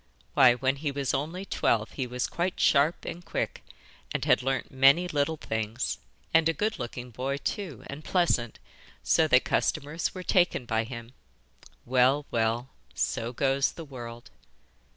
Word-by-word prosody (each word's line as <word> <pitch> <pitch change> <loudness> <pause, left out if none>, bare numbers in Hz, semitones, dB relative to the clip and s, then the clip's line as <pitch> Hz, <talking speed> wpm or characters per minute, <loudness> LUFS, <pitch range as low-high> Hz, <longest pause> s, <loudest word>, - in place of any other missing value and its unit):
Why, 130 -4 +7
when 130 +2 0
he 145 +1 -2
was 140 -1 -1
only 165 +7 -3
twelve 110 - +1
he 130 -3 -3
was 125 0 -2
quite 175 +1 -2
sharp 150 +4 +3
and 175 - -6
quick, 165 - -3 0.5
and - - -2
had - - +4
learnt 135 +1 -2
many 135 +7 +5
little 155 -1 0
things, 110 -1 -3 0.3
and 165 0 +5
a - - +2
good 215 +5 -1
looking 120 0 -6
boy 135 +4 -2
too, 155 - -4
and 140 +3 -8
pleasant, 160 - +1 0.5
so - - +4
that - - +5
customers 150 +7 -1
were 185 - -5
taken 175 -8 +2
by 110 0 0
him. 115 +1 -8 0.7
Well, 130 +3 +3
well! 115 +2 0 0.3
so 115 +1 -1
goes 135 +2 +1
the 165 - -8
world! 120 -4 -9
135 Hz, 155 wpm, -28 LUFS, 120-160 Hz, 0.7 s, Why